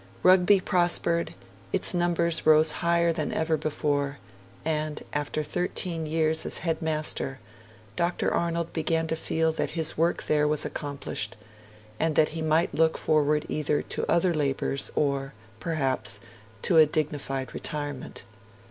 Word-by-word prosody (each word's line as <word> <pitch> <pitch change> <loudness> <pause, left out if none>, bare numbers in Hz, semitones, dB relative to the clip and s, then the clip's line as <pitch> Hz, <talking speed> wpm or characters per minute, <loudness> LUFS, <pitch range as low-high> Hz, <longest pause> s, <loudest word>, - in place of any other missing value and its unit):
Rugby 185 +2 +6
prospered; 175 -2 +1 0.4
its - - +3
numbers 170 -1 +1
rose 155 0 +5
higher 170 +1 +1
than 155 -2 -2
ever 160 0 +1
before; 145 -2 -1 0.5
and, 155 -1 -2
after 145 +1 -2
thirteen 165 +1 -2
years 160 0 +1
as - - 0
headmaster, 155 -4 -1 0.6
Dr. 170 +5 0
Arnold 170 -1 -1
began 160 0 0
to 160 - -2
feel 160 0 0
that 160 - -3
his 160 -1 0
work 170 +1 +1
there 150 -1 +2
was 150 0 0
accomplished, 140 -7 -4 0.6
and 160 -1 +1
that 155 - +4
he 160 +1 -5
might 160 +2 +1
look 160 0 +2
forward 150 -1 +2
either 150 -1 0
to - - -3
other 170 +1 +3
labours 140 -2 -1
or, 140 -3 -1 0.2
perhaps, 135 -7 -1 0.4
to 170 - +3
a 155 -1 +8
dignified 145 -4 -3
retirement. 145 -3 -5
155 Hz, 135 wpm, -27 LUFS, 150-165 Hz, 0.6 s, a